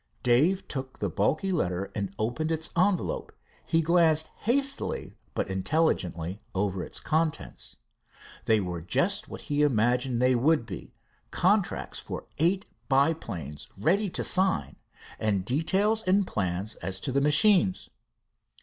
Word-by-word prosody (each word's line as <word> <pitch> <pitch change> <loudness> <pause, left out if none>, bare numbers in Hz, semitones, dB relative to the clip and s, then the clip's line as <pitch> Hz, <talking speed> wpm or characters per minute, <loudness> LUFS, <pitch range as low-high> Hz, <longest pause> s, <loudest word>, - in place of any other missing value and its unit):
Dave 150 +11 +3
took 130 -2 -5
the 100 -3 -2
bulky 145 - 0
letter 95 - -1
and 100 -2 -3
opened 120 +9 -1
its 160 0 -1
envelope. 185 +1 +1 0.4
He 165 -1 +2
glanced 160 -2 +3
hastily 270 +4 -1 0.2
but - - -1
intelligently 95 - -1
over 95 -1 0
its - - -3
contents. 155 - -2 0.7
They 110 -1 +4
were 90 -3 -4
just 85 - 0
what - - -8
he 145 0 -1
imagined 125 -2 +2
they 125 +1 +4
would 140 +2 +2
be, 95 -5 -9 0.3
contracts 195 +1 +1
for - - -6
eight 185 +5 +2 0.2
biplanes 135 - 0
ready 190 - +2
to - - -3
sign, 190 0 +1 0.4
and 100 -4 0
details 190 - +2
and 195 0 +2
plans 95 - -2
as 95 -2 -5
to - - -2
the 140 +2 +2
machines. 185 +6 +3
140 Hz, 130 wpm, -28 LUFS, -, 0.7 s, They